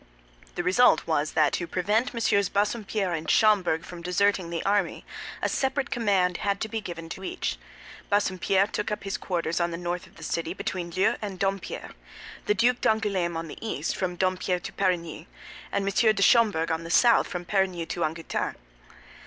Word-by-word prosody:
The 175 Hz, -, -2 dB
result 190 Hz, +8 st, +4 dB
was 155 Hz, -2 st, 0 dB
that 150 Hz, -2 st, +3 dB
to 170 Hz, -, -2 dB
prevent 210 Hz, +8 st, 0 dB
MM. 200 Hz, -5 st, +1 dB
Bassompierre 205 Hz, -2 st, 0 dB
and 160 Hz, -1 st, -3 dB
Schomberg 190 Hz, -6 st, +3 dB
from 175 Hz, -1 st, -9 dB
deserting 180 Hz, +1 st, +1 dB
the 170 Hz, -1 st, -4 dB
army, 200 Hz, -3 st, 0 dB, 0.4 s
a -, -, +3 dB
separate 270 Hz, +1 st, -1 dB
command 195 Hz, -7 st, +2 dB
had 200 Hz, -1 st, -1 dB
to 220 Hz, -, -1 dB
be 225 Hz, 0 st, -3 dB
given 165 Hz, -4 st, -7 dB
to 190 Hz, -, -7 dB
each. -, -, -3 dB, 0.5 s
Bassompierre 195 Hz, -1 st, +2 dB
took 210 Hz, 0 st, -3 dB
up 210 Hz, -, -3 dB
his 195 Hz, -1 st, -3 dB
quarters 170 Hz, -2 st, -2 dB
on 170 Hz, 0 st, +1 dB
the 170 Hz, -, -4 dB
north 175 Hz, +1 st, -4 dB
of -, -, -22 dB
the 165 Hz, -, -12 dB
city, 165 Hz, +2 st, -2 dB
between 180 Hz, -3 st, -4 dB
Leu 185 Hz, +4 st, +1 dB
and 200 Hz, -3 st, -5 dB
Dompierre; 195 Hz, -1 st, -3 dB, 0.6 s
the 210 Hz, -, +3 dB
Duc 240 Hz, +4 st, +3 dB
d'Angoulême 195 Hz, -6 st, +1 dB
on 165 Hz, 0 st, -4 dB
the -, -, -9 dB
east, 225 Hz, -, -2 dB
from 180 Hz, -2 st, -2 dB
Dompierre 185 Hz, 0 st, 0 dB
to -, -, -7 dB
Perigny; 170 Hz, -3 st, -1 dB, 0.4 s
and 200 Hz, -1 st, 0 dB
M. 215 Hz, +2 st, +3 dB
de 195 Hz, -, +2 dB
Schomberg 210 Hz, -10 st, +4 dB
on 160 Hz, +1 st, -1 dB
the 165 Hz, -, -7 dB
south, 235 Hz, +7 st, +5 dB
from 180 Hz, 0 st, -5 dB
Perigny 185 Hz, -3 st, 0 dB
to 170 Hz, +1 st, -3 dB
Angoutin. 160 Hz, +1 st, -2 dB
185 Hz, 185 wpm, -26 LUFS, 170-205 Hz, 0.6 s, south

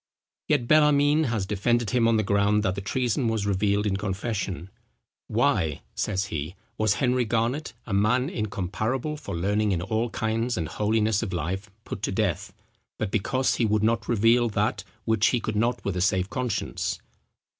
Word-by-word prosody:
Yet 140 Hz, -6 st, +1 dB
Bellarmine 150 Hz, +1 st, +4 dB
has 115 Hz, -6 st, -1 dB
defended 110 Hz, +3 st, 0 dB
him 120 Hz, -2 st, +3 dB
on 115 Hz, -1 st, +3 dB
the 110 Hz, -, +2 dB
ground 100 Hz, +1 st, +2 dB
that 95 Hz, -3 st, +1 dB
the 100 Hz, -, -5 dB
treason 120 Hz, +4 st, 0 dB
was 110 Hz, -2 st, 0 dB
revealed 100 Hz, +1 st, +1 dB
in 95 Hz, -2 st, 0 dB
confession: 95 Hz, -2 st, -3 dB, 0.6 s
"Why," 75 Hz, -3 st, +1 dB
says 95 Hz, -2 st, -1 dB
he, 80 Hz, +4 st, -4 dB, 0.2 s
"was 110 Hz, -2 st, +2 dB
Henry 125 Hz, +1 st, +2 dB
Garnet, 115 Hz, +5 st, -1 dB
a 110 Hz, -, -4 dB
man 110 Hz, +6 st, +2 dB
incomparable 110 Hz, -, -2 dB
for 150 Hz, -, -6 dB
learning 105 Hz, +3 st, +1 dB
in 85 Hz, -, -1 dB
all 110 Hz, +4 st, -1 dB
kinds 115 Hz, +1 st, -1 dB
and 80 Hz, -3 st, -1 dB
holiness 110 Hz, 0 st, +1 dB
of 110 Hz, -5 st, -4 dB
life, 95 Hz, +5 st, -3 dB
put -, -, -6 dB
to -, -, -1 dB
death, -, -, -1 dB, 0.5 s
but 105 Hz, -3 st, -2 dB
because 130 Hz, +5 st, +1 dB
he 120 Hz, -, +2 dB
would 105 Hz, 0 st, +1 dB
not 115 Hz, -1 st, +1 dB
reveal 120 Hz, +1 st, +4 dB
that 105 Hz, -, -1 dB, 0.2 s
which 110 Hz, -1 st, +3 dB
he 125 Hz, -, +2 dB
could 110 Hz, -1 st, -3 dB
not 115 Hz, +4 st, 0 dB
with 100 Hz, -, -1 dB
a 90 Hz, -, -1 dB
safe 95 Hz, 0 st, +1 dB
conscience?" 125 Hz, -2 st, -2 dB
110 Hz, 175 wpm, -26 LUFS, 100-120 Hz, 0.6 s, Bellarmine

